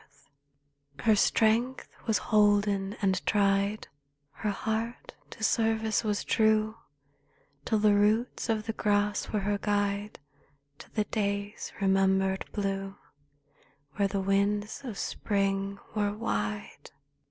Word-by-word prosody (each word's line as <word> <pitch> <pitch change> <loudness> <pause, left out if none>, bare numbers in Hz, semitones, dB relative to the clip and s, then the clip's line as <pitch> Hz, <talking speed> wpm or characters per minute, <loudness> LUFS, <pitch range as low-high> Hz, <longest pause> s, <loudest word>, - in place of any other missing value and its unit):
44 - - -30
THE - - -10
CLOUD - - -10
Her - - +6
strength 230 +5 +2 0.2
was 220 - +3
holden 205 -1 +2
and 190 -2 +1
tried, 200 0 +2 0.4
Her 215 - -3
heart 225 +3 -3 0.2
to 220 - -9
service 220 -1 +1
was 210 -2 -1
true, 220 0 +2 0.9
Till 220 - +1
the 210 0 +4
roots 215 +5 +1
of 215 -1 0
the 225 - -2
grass 205 -1 0
were 205 -1 -1
guide 205 0 -1 0.6
To - - -12
the 215 - +2
day's 200 -1 -3
remembered 190 0 +2
blue, 195 -1 -3 1.0
Where 200 -1 +3
the 195 0 -2
winds 200 +2 0
of 235 -7 -6
Spring 195 -1 -1 0.2
were 205 -1 0
wide. 105 - -4
205 Hz, 120 wpm, -29 LUFS, 195-215 Hz, 1.0 s, Her